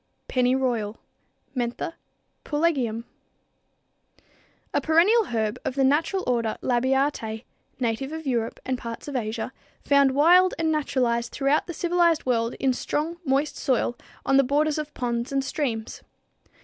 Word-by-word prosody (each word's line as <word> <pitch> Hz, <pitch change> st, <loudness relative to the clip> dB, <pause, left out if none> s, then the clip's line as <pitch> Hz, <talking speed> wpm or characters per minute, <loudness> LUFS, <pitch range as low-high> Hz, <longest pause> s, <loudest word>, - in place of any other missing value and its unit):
=Pennyroyal= 250 Hz, -4 st, +1 dB, 0.6 s
(Mentha 245 Hz, +5 st, -2 dB, 0.5 s
Pulegium, 295 Hz, -3 st, +1 dB
Linn.), 225 Hz, +1 st, -4 dB, 1.7 s
a -, -, +2 dB
perennial 375 Hz, +8 st, +4 dB
herb 220 Hz, -, -2 dB
of 260 Hz, -, -3 dB
the 275 Hz, -, +2 dB
natural 320 Hz, +8 st, +2 dB
order 230 Hz, -3 st, 0 dB
Labiatæ, 255 Hz, -3 st, 0 dB, 0.4 s
native 250 Hz, +3 st, -1 dB
of 320 Hz, 0 st, -6 dB
Europe 235 Hz, -4 st, -1 dB
and 255 Hz, -1 st, -1 dB
parts 230 Hz, +3 st, -7 dB
of 285 Hz, -, -5 dB
Asia, 225 Hz, 0 st, -3 dB, 0.3 s
found 280 Hz, -2 st, +4 dB
wild 355 Hz, +5 st, +5 dB
and 320 Hz, -1 st, +1 dB
naturalized 245 Hz, -6 st, 0 dB
throughout 280 Hz, +2 st, +1 dB
the 345 Hz, -, -5 dB
civilized 345 Hz, -2 st, +2 dB
world 230 Hz, -2 st, 0 dB
in 265 Hz, -1 st, +1 dB
strong, 310 Hz, +6 st, -2 dB
moist 275 Hz, +2 st, +1 dB
soil 245 Hz, -2 st, 0 dB, 0.3 s
on 270 Hz, -, +4 dB
the 275 Hz, -, +6 dB
borders 295 Hz, +3 st, +1 dB
of 300 Hz, -1 st, -5 dB
ponds 240 Hz, 0 st, -2 dB
and 275 Hz, 0 st, +1 dB
streams. 245 Hz, -6 st, -3 dB
265 Hz, 135 wpm, -25 LUFS, 235-300 Hz, 1.7 s, the